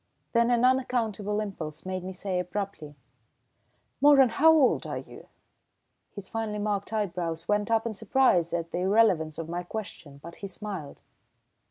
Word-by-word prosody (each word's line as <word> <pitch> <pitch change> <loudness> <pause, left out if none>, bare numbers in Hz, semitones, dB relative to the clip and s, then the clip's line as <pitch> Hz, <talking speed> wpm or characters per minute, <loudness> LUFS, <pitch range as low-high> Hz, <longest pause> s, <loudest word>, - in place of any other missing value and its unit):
Then 235 0 +3
an 240 0 +3
unaccountable 225 -5 0
impulse 180 -8 -6
made 185 -1 -4
me 185 - -5
say 185 0 -3
abruptly: 180 -5 -5 1.1
"Moeran, 280 -3 +7
how 315 +8 +5
old 300 -5 +3
are - - -4
you?" - - -11 0.9
His 200 -2 -8
finely 220 -2 -3
marked 205 -1 -2
eyebrows 175 -6 -3
went 210 0 +1
up 225 0 +2
in 230 - -2
surprise 215 -6 +2
at 170 -1 -3
the - - -2
irrelevance 185 -5 +2
of 165 - -5
my 175 +1 -3
question, 175 -7 -8
but 170 +4 -11
he 200 - -6
smiled. 190 -7 -7
200 Hz, 155 wpm, -27 LUFS, 175-225 Hz, 1.1 s, Moeran